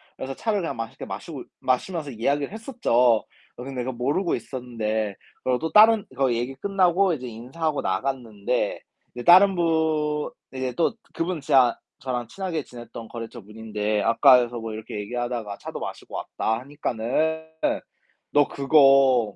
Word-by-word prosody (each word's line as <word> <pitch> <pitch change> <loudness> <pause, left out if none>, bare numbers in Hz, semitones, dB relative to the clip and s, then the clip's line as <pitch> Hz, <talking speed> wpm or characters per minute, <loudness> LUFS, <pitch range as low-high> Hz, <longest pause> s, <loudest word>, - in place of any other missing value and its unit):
그래서 135 0 -6
차를 210 - -1
그냥 165 - -3
맛있게 115 0 -6
마시고 - - -7 0.2
마시면서 145 +4 -1
이야기를 140 - -1
했었죠. 230 +3 -4
어 120 -2 +4 0.3
근데 130 0 -5
내가 130 +2 -2
모르고 140 +9 0
있었는데 110 -5 -3 0.3
그리고 125 -1 +1
또 160 +5 -3
다른 220 0 +7
그 135 -1 +2
얘기 120 +3 -2
끝나고 190 +2 +2
이제 130 -5 -5
인사하고 135 +7 -3
나갔는데 110 0 -2 0.3
이제 120 - -5
다른 190 +5 +7
분 160 -3 +1 0.2
이제 130 -1 -3
또 170 - +2 0.2
그분 165 -1 -2
진짜 130 -3 +4 0.2
저랑 125 -3 -3
친하게 175 - -4
지냈던 120 -2 -10
거래처분인데 110 -2 -4
"아까에서 120 +1 +5
뭐 115 -1 -5
이렇게 110 -1 -6
얘기하다가 120 -1 -4
차도 - - -7
마시고 - - -7
왔다." 110 +1 -2
하니까는 145 +4 -2 0.8
너 145 -1 +4
그거 135 -6 +4
130 Hz, 345 characters per minute, -24 LUFS, 115-160 Hz, 0.8 s, 다른